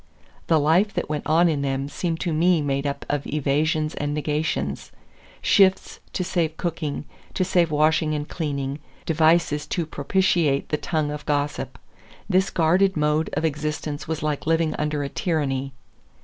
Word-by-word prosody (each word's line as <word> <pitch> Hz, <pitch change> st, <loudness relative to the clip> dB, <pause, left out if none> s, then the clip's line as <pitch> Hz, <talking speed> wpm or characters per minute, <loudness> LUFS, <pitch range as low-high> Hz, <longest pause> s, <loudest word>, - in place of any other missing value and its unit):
The 160 Hz, -2 st, +4 dB
life 170 Hz, +8 st, +3 dB
that -, -, -2 dB
went 150 Hz, -1 st, -3 dB
on 165 Hz, +3 st, +4 dB
in 150 Hz, -4 st, 0 dB
them 135 Hz, 0 st, -1 dB
seemed 165 Hz, +2 st, -3 dB
to 170 Hz, -3 st, -1 dB
me 170 Hz, +2 st, +3 dB
made 140 Hz, -1 st, -1 dB
up 140 Hz, 0 st, -4 dB
of 145 Hz, -1 st, -2 dB
evasions 155 Hz, +2 st, 0 dB
and 145 Hz, 0 st, -2 dB
negations; 150 Hz, +1 st, -2 dB, 0.5 s
shifts 190 Hz, -2 st, +3 dB
to 185 Hz, -, -1 dB
save 170 Hz, -3 st, -1 dB
cooking, 155 Hz, -4 st, -3 dB, 0.3 s
to 185 Hz, -, +1 dB
save 175 Hz, -2 st, +2 dB
washing 155 Hz, +1 st, +2 dB
and 150 Hz, 0 st, -3 dB
cleaning, 140 Hz, -3 st, -3 dB, 0.3 s
devices 160 Hz, -2 st, +2 dB
to 170 Hz, +2 st, -1 dB
propitiate 155 Hz, -1 st, +1 dB
the 150 Hz, -, +1 dB
tongue 155 Hz, -2 st, -1 dB
of 150 Hz, 0 st, -7 dB
gossip. 145 Hz, 0 st, -1 dB, 0.5 s
This 190 Hz, +1 st, +2 dB
guarded 180 Hz, +3 st, +2 dB
mode 150 Hz, +1 st, +1 dB
of -, -, 0 dB
existence 150 Hz, -1 st, -3 dB
was 160 Hz, -1 st, -3 dB
like 150 Hz, -1 st, -2 dB
living 165 Hz, -1 st, +2 dB
under 150 Hz, -1 st, -1 dB
a -, -, -2 dB
tyranny. 140 Hz, -5 st, -1 dB
155 Hz, 160 wpm, -24 LUFS, 145-165 Hz, 0.5 s, The